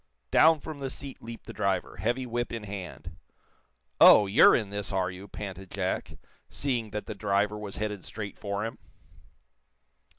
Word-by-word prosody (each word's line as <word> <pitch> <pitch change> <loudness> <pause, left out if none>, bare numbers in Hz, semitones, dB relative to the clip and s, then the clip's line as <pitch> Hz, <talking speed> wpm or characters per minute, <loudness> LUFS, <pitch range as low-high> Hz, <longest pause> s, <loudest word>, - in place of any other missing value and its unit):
Down 160 0 +6
from 150 0 -8
the 135 -1 -3
seat 135 0 -7
leaped 115 0 -9
the - - -8
driver, - - -1
heavy 120 +3 -1
whip 120 0 -2
in 115 -2 -5
hand. 100 -3 -8 0.8
"Oh, 105 - +9
you're 100 +1 +7
in 105 -4 -1
this, 100 0 -3
are 95 -1 0
you?" 95 +2 -10
panted 95 -2 -7
Jack, 95 -1 -3 0.3
seeing 125 -6 -2
that 105 0 -5
the - - -5
driver 100 +1 0
was 105 -2 -7
headed 105 -3 -3
straight 105 -3 -6
for 100 +1 -3
him. 115 - -6
105 Hz, 165 wpm, -28 LUFS, 100-115 Hz, 0.8 s, Oh